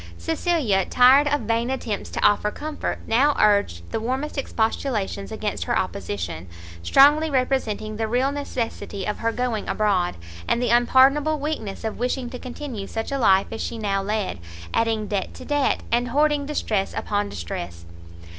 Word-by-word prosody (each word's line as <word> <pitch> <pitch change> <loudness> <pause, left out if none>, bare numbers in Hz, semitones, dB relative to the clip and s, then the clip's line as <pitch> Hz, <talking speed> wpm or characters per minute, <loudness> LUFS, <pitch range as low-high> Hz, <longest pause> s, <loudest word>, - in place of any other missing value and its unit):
Cecilia, 200 - +1
tired 260 +7 +5
of 290 -1 +1
vain 230 +2 0
attempts 235 -6 -3
to - - -4
offer 205 0 +3
comfort, 300 +7 -4
now 275 +6 +3
urged 200 - +3
the - - -1
warmest 260 +6 -3
expostulations 220 - -2
against - - -3
her - - +1
opposition, 85 -3 -4 0.3
strongly 295 - +5
representing 255 -6 -1
the 225 0 -1
real 250 +5 +1
necessity 240 -8 -4
of 210 - -3
her 230 0 0
going 240 -3 -2
abroad, 195 -5 +1 0.3
and - - +2
the 245 -1 0
unpardonable 270 +5 +4
weakness 280 -9 -4
of 220 -1 -4
wishing 250 0 -2
to 250 - -7
continue 245 -5 -6
such 225 +4 -4
a 275 - -1
life 195 -5 +4
as 225 - -5
she 235 - -4
now 200 -3 -1
led, 205 - -2 0.3
adding 225 -2 +1
debt 200 -2 -3
to 255 - -10
debt, 290 -2 +1
and 240 +1 +2
hoarding 290 +2 +1
distress 215 -9 -1
upon 205 0 -1
distress. 85 0 -6
230 Hz, 160 wpm, -23 LUFS, 205-270 Hz, 0.3 s, tired